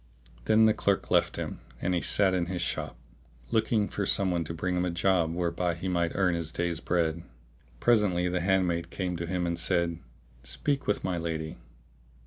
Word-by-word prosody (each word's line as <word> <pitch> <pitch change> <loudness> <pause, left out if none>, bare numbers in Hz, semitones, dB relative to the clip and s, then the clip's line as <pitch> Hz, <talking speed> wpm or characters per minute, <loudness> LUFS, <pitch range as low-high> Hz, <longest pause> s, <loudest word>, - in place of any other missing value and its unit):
Then 110 +1 +5
the 110 - +5
clerk 100 -2 0
left - - +3
him - - -4 0.2
and 90 - 0
he 85 - +1
sat 95 -2 +2
in 90 -2 0
his 90 -1 -2
shop, 80 -6 -3 0.5
looking 110 -1 +2
for 100 -2 -3
some 95 -2 +2
one 85 -1 0
to 80 - -5
bring 90 +2 -1
him 90 - +1
a 90 - 0
job 85 -1 +2
whereby 85 0 -1
he 90 +3 -5
might 85 -2 0
earn 95 -3 +2
his 85 -2 -3
day's 85 -1 -2
bread. 85 -2 0 0.6
Presently 105 -7 +3
the 90 0 0
handmaid 90 -2 +1
came 90 -1 -3
to 85 0 -4
him 90 0 -1
and 85 -1 -1
said, 85 -1 +1 0.4
"Speak 140 - -2
with 105 - 0
my 90 -2 -1
lady." 80 -2 -4
90 Hz, 190 wpm, -28 LUFS, 85-95 Hz, 0.6 s, Then